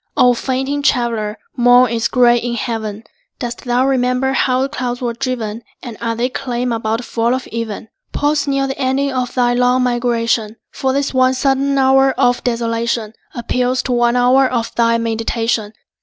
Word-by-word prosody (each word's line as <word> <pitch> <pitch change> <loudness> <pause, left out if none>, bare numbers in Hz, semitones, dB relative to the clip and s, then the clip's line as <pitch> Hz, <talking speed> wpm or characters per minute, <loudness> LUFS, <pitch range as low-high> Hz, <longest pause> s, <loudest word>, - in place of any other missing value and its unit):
O 250 0 +5
fainting 265 +3 -2
traveller, 230 -6 0 0.2
morn 245 0 +5
is 230 -1 0
gray 240 -1 +4
in 235 0 -3
heaven. 220 -2 -4 0.3
Dost 240 -2 -6
thou 245 +1 +2
remember 260 0 +1
how 260 -1 +1
the 275 - -2
clouds 245 -4 -3
were 240 -2 -2
driven? 235 -3 -4 0.2
And 240 -3 -7
are 230 -1 -1
they 240 +2 0
calm 250 -1 -3
about 225 -1 -1
the 250 - -7
fall 235 +1 0
of 260 - -5
even? 220 -2 -5 0.2
Pause 295 0 0
near 275 -1 +1
the 270 0 -5
ending 275 +1 0
of 250 -2 -3
thy 245 -1 +2
long 250 +1 +2
migration; 235 -3 0 0.2
For 265 - -1
this 280 +1 -1
one 260 0 +3
sudden 275 +1 +1
hour 270 0 +4
of 245 0 +2
desolation 230 -2 -1 0.2
Appeals 250 +1 -1
to 255 - -3
one 240 0 +2
hour 255 +2 +4
of 230 -2 -2
thy 230 0 +2
meditation. 225 -1 -1
245 Hz, 175 wpm, -17 LUFS, 230-260 Hz, 0.3 s, O